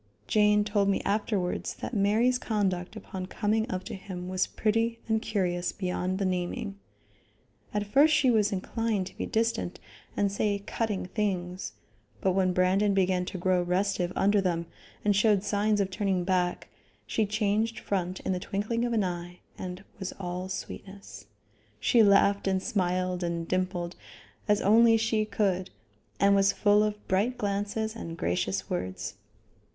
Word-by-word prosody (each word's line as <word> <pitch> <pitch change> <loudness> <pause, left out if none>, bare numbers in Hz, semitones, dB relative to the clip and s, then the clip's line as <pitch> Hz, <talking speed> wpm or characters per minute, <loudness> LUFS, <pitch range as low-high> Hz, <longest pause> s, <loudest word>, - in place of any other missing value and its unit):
Jane 210 -1 +4
told 205 -1 +1
me 195 - +2
afterwards 200 -3 -1
that - - -6
Mary's 225 +5 +3
conduct 190 -6 -1
upon 185 -1 -6
coming 220 +4 0
up 185 -5 -3
to 225 - -7
him 185 -2 -7
was 185 0 +1
pretty 225 +2 0
and 220 -1 +1
curious 180 -5 -1
beyond 185 -1 -2
the 195 - -1
naming. 190 +3 -2 0.9
At 210 0 -1
first 280 +9 +5
she 290 -4 +4
was 210 -2 +3
inclined 205 +1 -1
to 185 - -10
be - - -4
distant, 225 -5 -1 0.4
and 200 -1 +2
say 200 0 0
cutting 215 -5 -2
things, 185 -2 -2 0.5
but 190 - +2
when 185 0 +2
Brandon 190 +3 +2
began 185 -1 +2
to 190 - -5
grow 185 0 +2
restive 180 0 0
under 200 +1 +3
them 170 -3 -1 0.4
and 205 -1 +4
showed 210 -1 +3
signs 210 +1 +1
of 195 -1 0
turning 190 -2 0
back, 180 -1 0 0.4
she 220 -2 0
changed 215 +2 0
front 185 -2 -2
in - - -2
the 180 - 0
twinkling 215 +6 -1
of 240 - -1
an 220 -3 +2
eye 175 -1 -4 0.2
and 185 +1 -6 0.2
was 190 -1 -4
all 180 0 -4
sweetness. 195 +1 -8 0.5
She 235 - +4
laughed 200 -1 +4
and 190 -1 +2
smiled 180 -1 0
and 170 -1 -2
dimpled, 180 -1 -1 0.5
as 210 -1 +3
only 225 +3 +6
she 225 -1 +1
could, 195 -3 0 0.5
and 200 0 +5
was 195 0 +4
full 205 0 +4
of 210 0 -2
bright 210 +7 +1
glances 205 +2 -2
and 165 -6 -6
gracious 95 - -1
words. 90 -1 -3
200 Hz, 155 wpm, -28 LUFS, 185-210 Hz, 0.9 s, only